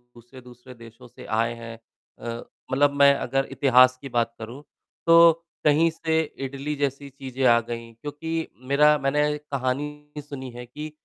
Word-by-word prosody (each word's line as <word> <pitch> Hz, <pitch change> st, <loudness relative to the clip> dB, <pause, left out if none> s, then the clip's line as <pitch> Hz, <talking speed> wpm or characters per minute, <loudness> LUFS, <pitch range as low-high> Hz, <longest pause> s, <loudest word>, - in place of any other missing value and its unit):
दूसरे-दूसरे 125 Hz, +1 st, -14 dB
देशों 115 Hz, +1 st, -15 dB
से -, -, -14 dB
आए 115 Hz, +2 st, 0 dB
हैं। 115 Hz, 0 st, -9 dB, 0.4 s
अ, 120 Hz, 0 st, -6 dB, 0.3 s
मतलब 145 Hz, +2 st, +3 dB
मैं 140 Hz, 0 st, +7 dB
अगर 135 Hz, +2 st, -1 dB
इतिहास 130 Hz, -2 st, +4 dB
की 135 Hz, -, -8 dB
बात 115 Hz, -1 st, 0 dB
करूँ, 120 Hz, +6 st, -9 dB, 0.4 s
तो 165 Hz, 0 st, +8 dB, 0.3 s
कहीं 155 Hz, +3 st, +4 dB
से 160 Hz, 0 st, -1 dB, 0.3 s
इडली 140 Hz, +3 st, -4 dB
जैसी 140 Hz, 0 st, -3 dB
चीज़ें 135 Hz, -1 st, -6 dB
आ 120 Hz, -1 st, +6 dB
गईं, 115 Hz, 0 st, -7 dB
क्योंकि 160 Hz, +5 st, -5 dB, 0.2 s
मेरा 150 Hz, +2 st, +5 dB
मैंने 150 Hz, +2 st, +1 dB
कहानी 150 Hz, +1 st, -4 dB
सुनी 140 Hz, -3 st, -8 dB
है 120 Hz, +1 st, -9 dB
कि 150 Hz, +5 st, -8 dB
135 Hz, 150 wpm, -24 LUFS, 120-150 Hz, 0.4 s, तो